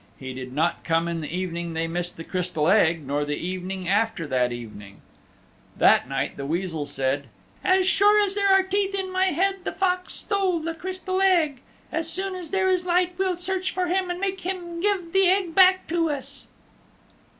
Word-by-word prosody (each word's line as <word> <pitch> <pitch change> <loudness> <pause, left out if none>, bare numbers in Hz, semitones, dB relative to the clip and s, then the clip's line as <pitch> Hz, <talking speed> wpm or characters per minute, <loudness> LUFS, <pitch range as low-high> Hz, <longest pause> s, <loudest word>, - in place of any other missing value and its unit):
He 130 -1 -7
did 130 0 -7
not 155 +6 0
come 165 0 +1
in 170 -1 -3
the 150 - -5
evening 170 -1 -3
they 165 0 0
missed 175 +1 -3
the 165 - -7
Crystal 180 -4 -1
Egg 165 -7 +3
nor 145 +2 -1
the 145 0 -2
evening 185 +2 -5
after 205 -3 +1
that 125 -3 +1
evening. 105 -4 -9 0.8
That - - +4
night - - -2
the 140 - -5
Weasel 165 -2 -2
said, 135 0 -1 0.4
"As 370 0 +3
sure 415 +2 +5
as 395 -1 0
there 400 0 +1
are 385 0 +6
teeth 395 +1 -1
in 380 -1 -3
my 370 0 +2
head 385 +3 +1
the - - -2
Fox 365 -1 0
stole 390 -4 +1
the 330 +1 -3
Crystal 370 +2 -3
Egg. 330 -9 +3 0.3
As 325 0 -1
soon 385 +2 -2
as 360 -3 -7
there 385 -1 +1
is 370 -1 +2
light 360 0 +1
we'll 375 -1 +1
search 370 +1 -2
for 365 -1 -1
him 370 0 0
and 355 0 -3
make 385 0 -2
him 350 -2 -5
give 380 -4 -1
the 385 -1 +4
Egg 370 -2 +1
back 375 +1 +5
to 335 -1 +1
us." 280 -1 -4
335 Hz, 195 wpm, -24 LUFS, -, 0.8 s, are